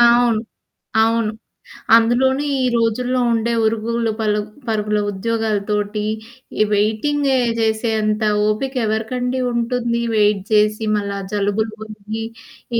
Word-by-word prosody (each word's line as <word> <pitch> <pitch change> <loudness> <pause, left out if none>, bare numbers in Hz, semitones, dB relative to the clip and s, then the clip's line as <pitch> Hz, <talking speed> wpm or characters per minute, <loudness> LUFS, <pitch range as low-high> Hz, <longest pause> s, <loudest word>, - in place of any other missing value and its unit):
అవును. 235 -2 +5 0.6
అవును. 225 -1 +2 0.6
అందులోని 255 +4 +3 0.2
ఈ - - +2
రోజుల్లో 245 +2 +1
ఉండే 230 +1 0
ఉరుగూలు, 225 +1 0
పలుగ్ 210 -1 -1 0.2
పరుగుల 210 -1 0
ఉద్యోగాలతోటీ, 210 0 -1 0.6
ఈ - - +6
వెయిటింగే 260 +7 +1 0.2
జేసేంత 220 -1 0 0.3
ఓపిక 260 +6 -1
ఎవరికండి 245 +4 -1
ఉంటుంది! 235 0 -1
వెయిట్ 210 -2 +3
జేసి, 215 +1 +3
మళ్ళా 200 -1 -3
జలుబులు 210 +1 0
బొయ్యి, 215 +1 -6 0.5
ఈ - - +3
220 Hz, 105 wpm, -19 LUFS, 210-235 Hz, 0.6 s, ఈ